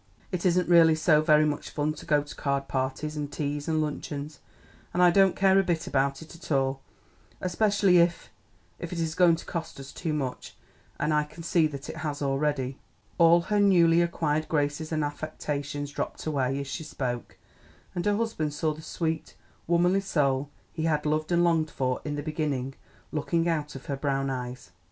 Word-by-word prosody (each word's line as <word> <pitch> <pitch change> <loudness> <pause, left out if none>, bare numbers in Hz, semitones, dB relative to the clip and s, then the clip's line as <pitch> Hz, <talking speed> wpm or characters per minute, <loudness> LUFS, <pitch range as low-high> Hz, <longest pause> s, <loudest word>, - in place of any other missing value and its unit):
It 180 0 0
isn't 180 0 +2
really 165 -2 +6
so 155 -1 +4
very 155 -1 +5
much 150 -1 -2
fun 150 0 -1
to 155 - -12
go 150 -1 +3
to 145 - -10
card 140 -1 -1
parties 135 +3 -2
and 145 -1 -4
teas 145 0 -3
and 155 -1 +1
luncheons, 150 -1 -5 0.6
and 180 - +4
I 175 - +7
don't 195 0 +4
care 195 0 +4
a - - +3
bit 170 -3 -1
about 135 +2 0
it 165 +1 -12
all, 135 -1 +1 0.6
especially 195 0 +3
if 170 0 +1 0.5
if - - -6
it 175 - -4
is 160 -1 -1
going 175 -1 +5
to 165 - -9
cost 165 -4 -5
us 135 0 -9
too 160 - -3
much; 135 -4 -4 0.4
and 155 - +1
I 150 0 +3
can 160 +3 -11
see 165 -1 +3
that 140 -1 -8
it - - -7
has 145 -2 -3
already." 135 -1 -1 0.4
All 170 +1 +6
her 210 +5 -1
little 205 -1 +5
newly 170 -2 +5
acquired 155 -2 0
graces 150 +1 -1
and 155 -1 0
affectations 145 -1 -4
dropped - - -4
away 135 -3 0
as 140 - -4
she 140 - -5
spoke, 125 -5 -4 0.6
and 175 - -2
her 205 0 +2
husband 160 -10 -2
saw 155 +1 0
the 155 - -11
sweet, 160 0 -3 0.3
womanly 175 +3 +3
soul 140 -7 0 0.2
he 160 -1 -2
had 150 -2 +1
loved 155 +2 0
and 175 0 +4
longed 165 -2 +2
for 130 -3 -2
in 150 -1 -3
the 145 - -4
beginning 145 -4 -2 0.4
looking 165 +2 0
out 150 -4 -1
of 135 - -9
her 140 - -2
brown 135 -1 -1
eyes. 125 -6 -6
155 Hz, 195 wpm, -27 LUFS, 145-170 Hz, 0.6 s, I